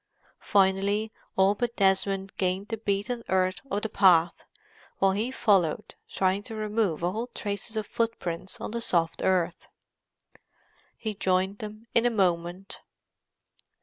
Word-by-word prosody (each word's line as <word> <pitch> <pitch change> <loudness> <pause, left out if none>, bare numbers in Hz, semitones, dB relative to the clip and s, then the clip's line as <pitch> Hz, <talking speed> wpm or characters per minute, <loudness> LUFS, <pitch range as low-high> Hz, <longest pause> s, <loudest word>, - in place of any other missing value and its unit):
Finally 200 +2 +2 0.3
all 190 +1 +5
but 235 +3 -2
Desmond 195 0 +1
gained 190 +2 -1
the 225 - -2
beaten 215 +3 -1
earth 185 0 +1
of 205 -5 -2
the - - +1
path, 175 -5 +4 0.5
while 195 0 +3
he 210 +5 -1
followed, 195 -11 +1 0.2
trying 190 +1 +1
to 220 +2 -9
remove 210 -6 -1
all 215 +7 -1
trace 205 +1 -4
of 215 -1 -1
footprints 190 -6 -3
on - - -5
the 235 +1 -3
soft 165 -6 0
earth. 180 -2 0 1.3
He 220 -2 -3
joined 190 0 0
them 215 +1 -8
in 235 +1 +4
a - - +4
moment. 185 -1 -1
195 Hz, 135 wpm, -27 LUFS, 185-215 Hz, 1.3 s, all